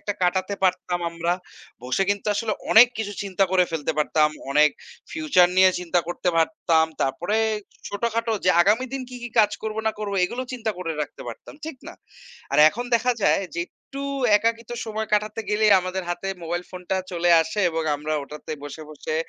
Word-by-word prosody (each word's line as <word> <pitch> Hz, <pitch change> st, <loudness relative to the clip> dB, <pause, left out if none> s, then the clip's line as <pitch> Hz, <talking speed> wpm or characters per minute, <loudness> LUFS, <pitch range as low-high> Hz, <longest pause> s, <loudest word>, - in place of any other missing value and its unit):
একটা 205 Hz, -, -3 dB
কাটাতে 185 Hz, +2 st, +1 dB
পারতাম 180 Hz, -1 st, +1 dB
আমরা, 170 Hz, +1 st, -1 dB, 0.5 s
বসে 130 Hz, +9 st, 0 dB
কিন্তু 205 Hz, +1 st, -2 dB
আসলে 215 Hz, +1 st, -1 dB, 0.2 s
অনেক 225 Hz, +3 st, +9 dB
কিছু 205 Hz, -2 st, -3 dB
চিন্তা 195 Hz, -1 st, +1 dB
করে 185 Hz, -1 st, +5 dB
ফেলতে 160 Hz, -1 st, -2 dB
পারতাম। 150 Hz, 0 st, +3 dB, 0.2 s
অনেক 150 Hz, +2 st, +5 dB, 0.4 s
ফিউচার 300 Hz, -, +4 dB
নিয়ে 185 Hz, 0 st, +7 dB
চিন্তা 175 Hz, 0 st, 0 dB
করতে 175 Hz, +1 st, -2 dB
পারতাম। 165 Hz, -1 st, +2 dB, 0.2 s
তারপরে 170 Hz, +10 st, -1 dB, 0.5 s
ছোটখাটো 230 Hz, +2 st, -1 dB
যে 185 Hz, -, +5 dB
আগামী 215 Hz, +7 st, +3 dB
দিন 270 Hz, -1 st, -3 dB
কি, 250 Hz, -, -8 dB
কি 240 Hz, -, -4 dB
কাজ 210 Hz, -2 st, +6 dB
করবো 220 Hz, 0 st, -3 dB
না 220 Hz, -, +2 dB
করবো? 205 Hz, -2 st, -3 dB
এগুলো 240 Hz, +7 st, -3 dB
চিন্তা 230 Hz, -3 st, -2 dB
করে 165 Hz, -3 st, -3 dB
রাখতে 150 Hz, -, -5 dB
পারতাম। 115 Hz, -, -10 dB
ঠিক 315 Hz, -4 st, -6 dB
না? -, -, -9 dB, 0.6 s
আর -, -, +2 dB
এখন 240 Hz, +7 st, -5 dB
দেখা 250 Hz, +2 st, +3 dB
যায় -, -, +3 dB
যে, -, -, -2 dB
একটু 275 Hz, +7 st, -10 dB, 0.3 s
একাকিত্ব 230 Hz, +2 st, -1 dB
সময় 220 Hz, 0 st, -3 dB
কাটাতে 210 Hz, +1 st, +1 dB
গেলেই, 210 Hz, 0 st, +4 dB
আমাদের 185 Hz, +1 st, -3 dB
হাতে 185 Hz, +2 st, -3 dB
মোবাইল 170 Hz, +1 st, -3 dB
ফোনটা 185 Hz, +1 st, -3 dB, 0.2 s
চলে 175 Hz, 0 st, +1 dB
আসে। 160 Hz, +6 st, -3 dB
এবং 165 Hz, 0 st, -2 dB
আমরা 150 Hz, +2 st, -4 dB
ওটাতে 150 Hz, +2 st, -8 dB
বসে, 145 Hz, +2 st, -8 dB
বসে 155 Hz, +1 st, -5 dB
190 Hz, 180 wpm, -24 LUFS, 170-220 Hz, 0.6 s, অনেক